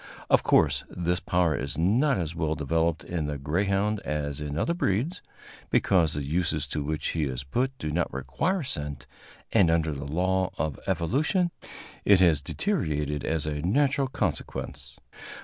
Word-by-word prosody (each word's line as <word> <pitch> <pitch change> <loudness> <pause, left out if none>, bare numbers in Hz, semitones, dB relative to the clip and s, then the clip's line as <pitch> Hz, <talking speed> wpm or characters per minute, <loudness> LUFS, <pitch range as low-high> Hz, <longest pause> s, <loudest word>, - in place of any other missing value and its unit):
Of - - +6
course, - - +3
this 90 +1 -1
power 85 -4 +1
is 70 +2 -3
not 115 - +3
as 85 -3 -2
well 80 -2 -1
developed 80 +2 0
in 80 -4 -3
the 75 -1 -3
greyhound 100 +8 0
as 75 -3 -3
in 75 0 -4
other 170 - +1
breeds, 155 - -1 0.5
because 85 -6 +3
the 75 - -2
uses 80 0 0
to 75 0 -2
which 75 +1 -2
he 80 -2 0
is 65 -1 -4
put 130 - -1
do 75 - -3
not 85 +2 0
require 70 - -1
scent, 75 - -5 0.5
and, 100 -7 +5
under 80 -1 +2
the 70 0 -5
law 95 +4 +1
of 75 -2 -2
evolution, 145 - +1 0.5
it 100 -2 +6
has 85 -6 +4
deteriorated 75 - -1
as 80 -2 -1
a 75 -1 -2
natural 135 - +2
consequence. 70 - -3
80 Hz, 160 wpm, -27 LUFS, 75-100 Hz, 0.5 s, Of